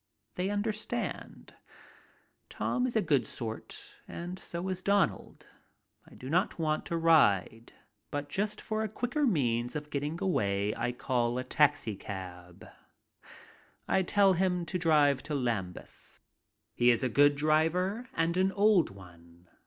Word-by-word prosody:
They 185 +2 -2
understand. 215 +3 -4 1.0
Tom 250 0 -1
is 240 - -5
a 220 - +3
good 135 -7 +1
sort 110 -2 -7
and 175 +2 -7
so 170 +2 -5
is 185 -1 -3
Donald. 200 -2 0 0.6
I - - -16
do 130 - -10
not 175 +7 0
want 155 -2 -1
to 170 - -2
ride, 115 - +3 0.4
but 145 0 -4
just 210 +5 -2
for 215 0 -2
a 220 - -2
quicker 245 +7 -1
means 120 - 0
of 150 0 -5
getting 145 +3 -2
away 100 - 0
I 120 +1 -1
call 125 -1 -1
a 130 - -2
taxicab. 95 - -2 1.2
I 190 - +2
tell 195 +1 +4
him 180 -1 0
to 180 +1 -3
drive 150 -5 +3
to 150 +1 -4
Lambeth. 115 -9 -4 0.5
He 120 - +3
is 120 +1 +3
a - - +2
good 145 +4 +4
driver, 165 - +1
and 165 +2 0
an 190 +1 +2
old 205 -4 +4
one. 85 -2 -16
155 Hz, 140 wpm, -30 LUFS, 120-190 Hz, 1.2 s, tell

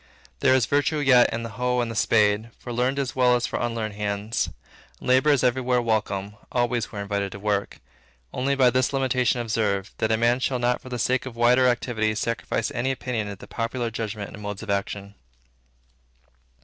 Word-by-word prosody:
There 130 - +4
is 130 -3 +3
virtue 145 +3 +1
yet 135 -4 +5
in 115 +1 -3
the 115 - -5
hoe 125 0 +1
and 120 -1 -1
the - - -6
spade, 105 0 +2
for 120 - -7
learned 125 +3 0
as 135 -2 -2
well 125 -1 +4
as 120 - 0
for - - -3
unlearned 115 -3 -2
hands. 105 +1 -2 0.5
And - - -9
labor 130 +4 +4
is 140 -4 +3
everywhere 125 0 +2
welcome; 105 -3 -1
always 120 -2 0
we - - -8
are 100 - -3
invited 100 -1 -2
to 100 - -8
work; 100 -1 -1 0.5
only 140 +2 0
be 130 -2 +5
this 130 +3 +1
limitation 125 -2 +1
observed, 105 -4 -1
that 110 - +1
a 110 - +3
man 120 +2 +2
shall 130 0 0
not 120 0 0
for 130 - -11
the 125 - -3
sake 130 +3 0
of 125 - -8
wider 125 +2 +4
activity 115 -3 0
sacrifice 115 +1 -2
any 120 +3 -1
opinion 125 -4 -2
to 100 - -5
the - - -12
popular 115 +1 -3
judgments 105 -2 -5
and 105 - -9
modes 105 0 -5
of 105 - -3
action. 100 0 -3
120 Hz, 200 wpm, -25 LUFS, 105-125 Hz, 0.5 s, yet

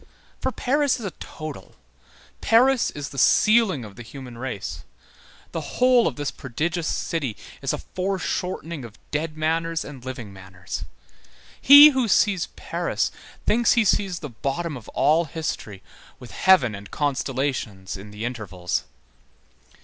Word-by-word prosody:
For 260 - -1
Paris 280 +1 +1
is 225 - -6
a 190 - -3
total. 155 -2 -9 0.7
Paris 250 +2 +4
is 145 -1 -6
the 140 - -5
ceiling 215 - +4
of 105 0 -12
the - - -8
human 125 +1 -10
race. 120 -4 -5 0.7
The - - -6
whole 250 -1 +5
of - - -2
this 145 -1 -3
prodigious 160 +6 -3
city 140 -10 -2 0.2
is - - 0
a - - -2
foreshortening 180 -4 -3
of 115 -2 -11
dead 155 +1 -2
manners 165 +1 -1
and 135 -4 -10
living 125 -6 -7
manners. 95 -1 -7 0.8
He 285 +2 +11
who 260 -4 0
sees 200 -3 +3
Paris - - -2 0.3
thinks 235 +2 +4
he 230 -2 +3
sees 190 -2 +1
the 150 - -6
bottom 145 +6 -3
of 120 -4 -10
all 160 +3 +3
history 155 - -5 0.4
with 125 -3 -11
heaven 185 - +4
and 100 0 -9
constellations 130 -8 -2
in 100 +2 -10
the 105 +2 -6
intervals. 100 -8 -3
150 Hz, 140 wpm, -24 LUFS, 120-190 Hz, 0.8 s, He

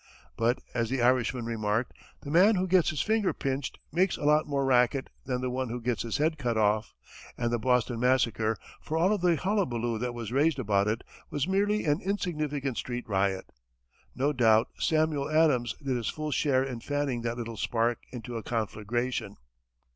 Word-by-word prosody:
But, 115 +2 +2 0.2
as 115 -2 0
the 130 +1 -1
Irishman 125 -1 +2
remarked, 115 0 -1 0.3
the 140 - -7
man 190 +7 +6
who 185 0 +1
gets 185 -2 +4
his 150 - -1
finger 215 -3 +1
pinched 135 0 -3
makes 180 +4 +2
a - - -8
lot 150 +1 +3
more 140 -2 0
racket 125 +1 +2
than 125 -2 -2
the 125 -1 -2
one 130 -1 -2
who 120 +2 -3
gets 120 -1 -1
his 115 - -2
head 155 +1 +1
cut 120 -4 -1
off; 105 0 +1 0.4
and 120 -1 -1
the 120 - +1
Boston 125 0 +1
massacre, 115 -3 +2 0.2
for 155 - -3
all 185 +6 +3
the 180 -3 +2
hullabaloo 125 - -1
that 120 0 -3
was 115 -2 -5
raised 145 +3 +2
about 100 -5 +1
it, 110 +2 -1 0.3
was 145 +2 -1
merely 205 +2 +1
an 145 +1 +1
insignificant 150 - -2
street 120 0 -4
riot. 95 -2 0 0.6
No 140 +4 +1
doubt 115 -3 +4
Samuel 155 -3 +1
Adams 145 -7 +3
did 135 -2 0
his 120 -3 -2
full 155 -1 -4
share 130 -2 +2
in 130 -3 -5
fanning 145 -2 -2
that 120 0 -3
little 115 -1 -5
spark 115 +1 0
into 120 -1 -6
a - - -4
conflagration! 110 0 -2
125 Hz, 185 wpm, -28 LUFS, 115-150 Hz, 0.6 s, man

